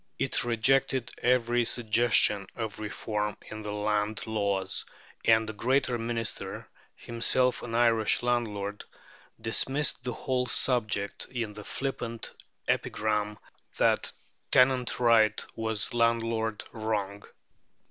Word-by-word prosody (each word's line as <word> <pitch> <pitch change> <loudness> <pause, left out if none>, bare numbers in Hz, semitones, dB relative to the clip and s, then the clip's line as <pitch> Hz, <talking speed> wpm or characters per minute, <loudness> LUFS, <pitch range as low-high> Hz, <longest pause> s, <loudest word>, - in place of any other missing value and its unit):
It - - 0
rejected 125 +2 +2
every 120 -1 +3
suggestion 110 -3 +2
of 110 -3 -4
reform 105 -1 -3
in 110 0 -6
the 105 -1 -5
Land 105 0 -1
laws; 100 -3 -1 0.4
and 110 -1 +5
a 110 - -4
great 130 +6 +1
Minister, 115 -2 -3 0.3
himself 125 +2 +1
an 115 -1 -5
Irish 115 -1 +3
landlord, 105 -4 -1 0.6
dismissed 130 +5 +1
the 125 0 -2
whole 125 +1 -1
subject 110 -4 0
in 115 -4 -3
the 105 - -9
flippant 120 -2 -4 0.3
epigram 105 -1 0 0.4
that - - +2 0.4
"tenant 125 -1 +3
right 115 -3 +4
was 110 -1 -2
landlord 115 -2 +1
wrong." 105 -3 -2
115 Hz, 105 wpm, -29 LUFS, 105-120 Hz, 0.6 s, and